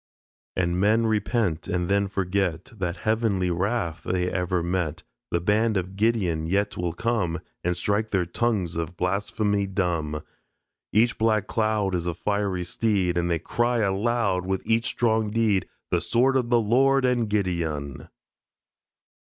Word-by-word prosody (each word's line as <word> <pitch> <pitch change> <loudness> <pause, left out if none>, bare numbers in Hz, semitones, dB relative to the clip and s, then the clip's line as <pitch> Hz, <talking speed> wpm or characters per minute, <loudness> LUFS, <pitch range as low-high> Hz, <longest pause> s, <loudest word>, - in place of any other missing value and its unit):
And 90 -1 0
men 110 +4 +3
repent 105 -5 0
and 90 -1 -1
then 100 +1 +2
forget 95 -2 -1
That 90 -3 -3
heavenly 110 -5 +1
wrath 90 -2 -1
they 90 -1 -1
ever 90 -1 0
met, 85 -3 -2 0.3
The 85 - +1
band 105 +4 +2
of 95 +1 -3
Gideon 100 -7 +1
yet 100 +2 0
will 90 -1 -2
come 90 -4 -1 0.2
And 90 0 0
strike 105 +4 0
their 95 -4 +1
tongues 95 -2 -1
of 85 +1 -4
blasphemy 100 +2 0
dumb. 85 -6 -1 0.7
Each 115 +3 +3
black 110 -2 +2
cloud 110 -4 0
Is 90 -1 -1
a 85 - -1
fiery 100 0 -1
steed. 95 -1 0
And 85 0 0
they 85 - +2
cry 120 +8 0
aloud 100 -1 +1
With 95 0 -2
each 115 0 +2
strong 110 -2 +1
deed, 105 -3 +1 0.2
"The - - +2
sword 130 +3 +2
of 125 -3 +1
the 120 -1 +4
Lord 130 +5 +3
and 120 -3 +1
Gideon." 85 -9 -2
100 Hz, 150 wpm, -25 LUFS, 90-110 Hz, 0.7 s, the